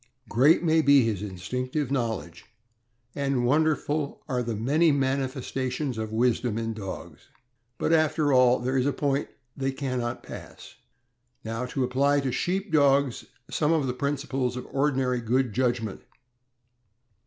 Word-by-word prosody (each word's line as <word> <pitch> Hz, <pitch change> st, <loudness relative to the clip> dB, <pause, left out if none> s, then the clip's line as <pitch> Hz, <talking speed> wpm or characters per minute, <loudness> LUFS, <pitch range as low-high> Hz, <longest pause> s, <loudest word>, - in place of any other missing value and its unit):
Great 140 Hz, +11 st, +4 dB
may 160 Hz, -1 st, +4 dB
be 140 Hz, -4 st, +5 dB
his 105 Hz, -4 st, -1 dB
instinctive 125 Hz, -, -3 dB
knowledge, 110 Hz, -10 st, -3 dB, 0.7 s
and 140 Hz, -3 st, 0 dB
wonderful 150 Hz, +1 st, 0 dB
are 125 Hz, -4 st, -1 dB
the 115 Hz, -2 st, -3 dB
many 150 Hz, +9 st, +3 dB
manifestations 130 Hz, 0 st, -1 dB
of 110 Hz, -1 st, -4 dB
wisdom 120 Hz, 0 st, +1 dB
in 115 Hz, 0 st, -2 dB
dogs; 95 Hz, -4 st, -8 dB, 0.5 s
but, 160 Hz, -, +1 dB
after 155 Hz, -2 st, +2 dB
all, 125 Hz, -1 st, +5 dB
there 130 Hz, +2 st, -2 dB
is 130 Hz, -, +1 dB
a 145 Hz, -, +1 dB
point 140 Hz, -1 st, 0 dB, 0.3 s
they 135 Hz, -1 st, -1 dB
can 135 Hz, -2 st, -3 dB
not 120 Hz, 0 st, -4 dB
pass. -, -, -10 dB, 0.7 s
Now 115 Hz, +2 st, -3 dB
apply 135 Hz, +3 st, +1 dB
to 135 Hz, -2 st, -1 dB
Sheep 190 Hz, -, -2 dB
Dogs 140 Hz, -3 st, +3 dB, 0.3 s
some 150 Hz, 0 st, +1 dB
of 160 Hz, -4 st, +2 dB
the 125 Hz, -, -1 dB
principles 135 Hz, -2 st, -2 dB
of 125 Hz, -, -6 dB
ordinary 135 Hz, -3 st, +1 dB
good 120 Hz, 0 st, 0 dB
judgment. 120 Hz, -4 st, -1 dB
130 Hz, 140 wpm, -26 LUFS, 120-145 Hz, 0.7 s, be